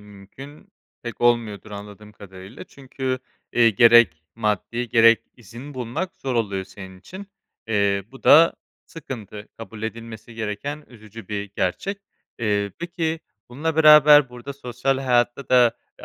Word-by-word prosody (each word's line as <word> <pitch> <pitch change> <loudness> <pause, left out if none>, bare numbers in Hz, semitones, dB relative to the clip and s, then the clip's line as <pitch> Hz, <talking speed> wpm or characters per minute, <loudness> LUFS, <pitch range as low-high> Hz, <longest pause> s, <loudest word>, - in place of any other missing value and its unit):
mümkün 105 - -14 0.3
pek 120 -1 -8
olmuyordur 115 -3 0
anladığım 105 +1 -11
kadarıyla. 95 -1 -12
Çünkü, 130 -1 -5 0.4
ııı, 115 -1 +6
gerek 115 -6 +5
maddi 110 +2 -2
gerek 115 0 +5
izin 120 +6 -12
bulmak 125 +10 -5
zor 130 -2 -4
oluyor 100 -4 -2
senin 95 -1 -12
için. 190 - -11 0.4
Eee, 100 -3 0
bu 135 - -14
da 165 +3 +6 0.3
sıkıntı, 110 - -9
kabul 110 -1 -10
edilmesi 115 0 -8
gereken 115 +8 -5
üzücü 110 -3 -13
bir 100 -1 -5
gerçek. 195 - -2 0.4
Eee, 105 -3 -1
peki 165 -2 -3 0.3
bununla 155 +6 -3
beraber 150 -3 +7
burada 125 +3 -9
sosyal 130 0 -2
hayatta 125 0 0
da, 125 -2 +4 0.2
eee, - - -12
115 Hz, 130 wpm, -22 LUFS, 105-135 Hz, 0.4 s, beraber